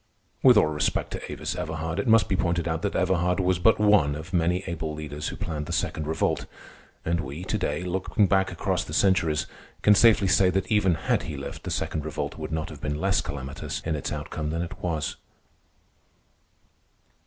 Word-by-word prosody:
With 125 -4 +7
all - - +6
respect 75 -1 -1
to - - -6
Avis - - -4
Everhard, 80 +2 -3
it 100 - -2
must 115 -1 +5
be 95 - 0
pointed 85 -2 0
out 80 0 -1
that 100 - -2
Everhard 90 0 +1
was 90 -1 +1
but 110 +5 +5
one 105 -9 +4
of 80 +5 -8
many 90 +2 +1
able 80 -3 -4
leaders 75 -1 -5
who - - -4
planned 75 -2 -4
the - - -5
Second 80 -2 -1
Revolt. 80 +1 0 0.6
And 85 +1 +1
we 70 +6 -6
to - - -1
day, 75 +5 -1
looking 95 +3 +1
back 95 0 +2
across - - -1
the - - -6
centuries, 85 -6 +2 0.4
can 105 - +7
safely 105 -2 +5
say 95 0 +4
that 95 +1 -1
even 95 -5 +3
had - - 0
he - - -5
lived, - - -7
the - - -3
Second 75 - -2
Revolt 75 -1 -4
would 80 0 -5
not 80 -1 -2
have 75 -2 -10
been 75 0 -2
less 95 +1 +2
calamitous 70 -1 -5
in 80 -1 -2
its 75 - -4
outcome 75 -1 -4
than 80 +2 -1
it 85 - -8
was. 80 -4 -2
85 Hz, 200 wpm, -26 LUFS, 75-95 Hz, 0.6 s, With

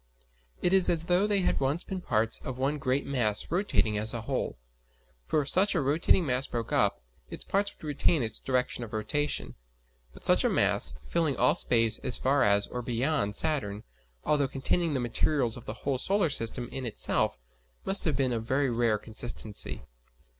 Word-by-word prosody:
It 180 - +2
is 190 -2 +7
as 165 -1 +1
though 180 +4 +2
they 205 -2 +1
had - - 0
once 140 +6 -1
been 190 -1 -6
parts 110 -8 +1
of 130 - -7
one 140 +3 -1
great 135 +1 -1
mass 120 -6 -1
rotating 170 - +1
as 110 +2 +2
a 115 - -3
whole; 110 - -3 0.7
for 155 - +1
if 140 - -3
such 195 +2 +3
a - - +2
rotating 155 +5 +2
mass 130 -1 0
broke 115 -2 -5
up, - - +1 0.3
its - - -7
parts 200 +1 0
would - - -24
retain 150 -1 +1
its 110 -1 -4
direction 125 -1 -1
of 115 0 -10
rotation. 110 - -2 0.6
But - - -15
such - - +5
a - - +2
mass, - - +3
filling 145 - 0
all 125 - +4
space 115 -2 +3
as 125 - -1
far 135 +2 +1
as 100 0 +3
or 125 - -6
beyond 120 -2 -1
Saturn, 110 -10 -1 0.4
although 145 -2 +1
containing 150 +4 -1
the - - 0
materials 120 0 0
of 120 - -11
the 105 - -6
whole 135 -2 0
solar 190 0 +1
system 120 0 +1
in 135 - -6
itself, 110 - -1 0.5
must 195 +1 +2
have 155 -4 +1
been 130 -2 0
of 115 -1 -3
very 130 +2 0
rare 115 -2 +1
consistency. 110 - -3
130 Hz, 190 wpm, -28 LUFS, 115-155 Hz, 0.7 s, is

